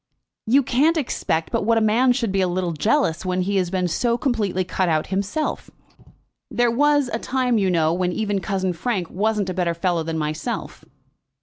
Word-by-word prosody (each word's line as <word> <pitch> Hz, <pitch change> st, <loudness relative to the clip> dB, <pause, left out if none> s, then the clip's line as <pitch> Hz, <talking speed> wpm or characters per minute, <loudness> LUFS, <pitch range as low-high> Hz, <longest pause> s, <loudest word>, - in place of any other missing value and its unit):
"You 270 Hz, +5 st, +4 dB
can't 295 Hz, +8 st, +2 dB
expect 165 Hz, -, -1 dB
but -, -, 0 dB
what 230 Hz, +2 st, +2 dB
a 220 Hz, -, +3 dB
man 240 Hz, +4 st, +3 dB
should 240 Hz, -4 st, 0 dB
be 195 Hz, 0 st, +1 dB
a 185 Hz, -, +2 dB
little 180 Hz, 0 st, -1 dB
jealous, 170 Hz, -, +1 dB
when 185 Hz, 0 st, -1 dB
he 200 Hz, +2 st, 0 dB
has 180 Hz, -2 st, 0 dB
been 185 Hz, -1 st, 0 dB
so 235 Hz, +7 st, 0 dB
completely 210 Hz, -8 st, 0 dB
cut 185 Hz, 0 st, -1 dB
out 155 Hz, -1 st, +1 dB
himself. 200 Hz, +11 st, -2 dB, 0.8 s
There 240 Hz, -1 st, +1 dB
was 290 Hz, +2 st, +3 dB
a 225 Hz, -, -1 dB
time, 250 Hz, -3 st, 0 dB
you 195 Hz, -2 st, +1 dB
know, 165 Hz, -2 st, +2 dB
when 180 Hz, 0 st, 0 dB
even 205 Hz, +1 st, -1 dB
cousin 190 Hz, -1 st, -2 dB
Frank 185 Hz, -1 st, -3 dB
wasn't 205 Hz, -1 st, 0 dB
a -, -, -4 dB
better 175 Hz, -2 st, -1 dB
fellow 170 Hz, 0 st, 0 dB
than 160 Hz, 0 st, -3 dB
myself." 155 Hz, +9 st, -4 dB
195 Hz, 195 wpm, -22 LUFS, 180-240 Hz, 0.8 s, You